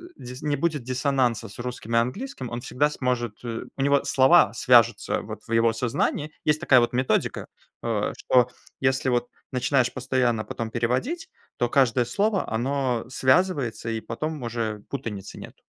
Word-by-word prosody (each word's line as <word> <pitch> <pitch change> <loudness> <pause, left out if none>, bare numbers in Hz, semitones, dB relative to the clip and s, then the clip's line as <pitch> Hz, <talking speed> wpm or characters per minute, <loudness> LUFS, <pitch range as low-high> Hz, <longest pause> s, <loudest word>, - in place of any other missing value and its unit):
дис 125 +1 -9
не 150 -1 0
будет 150 0 -1
диссонанса 130 -2 0
с 100 - -13
русским 120 -2 -4
и - - +6
английским. 130 - -3
Он 120 +1 -5
всегда 135 +3 +1
сможет 125 -6 -2
э, 115 -1 -4
у - - -2
него 140 0 +3
слова 135 +6 +5
свяжутся 120 -5 +3
вот 110 0 -8
в - - -10
его 115 0 +4
сознании. 130 +5 -1
Есть 150 +1 +2
такая 130 -6 +6
вот 120 0 +1
методика, 130 +1 0 0.4
а, 110 -3 0
что 125 -1 +3 0.3
если 130 0 +1
вот 120 -1 +1 0.2
начинаешь 130 0 +1
постоянно 125 -3 0
потом 115 -1 -5
переводить, 130 - -1 0.3
то 120 - +1
каждое 125 -2 +3
слово, 200 - 0
оно 125 +1 -1
связывается, 130 -4 +1
и 110 -1 -2
потом 155 +7 -4
уже 115 -3 -3
путаницы 105 -7 -6
нет. - - -11
125 Hz, 160 wpm, -25 LUFS, 115-140 Hz, 0.4 s, и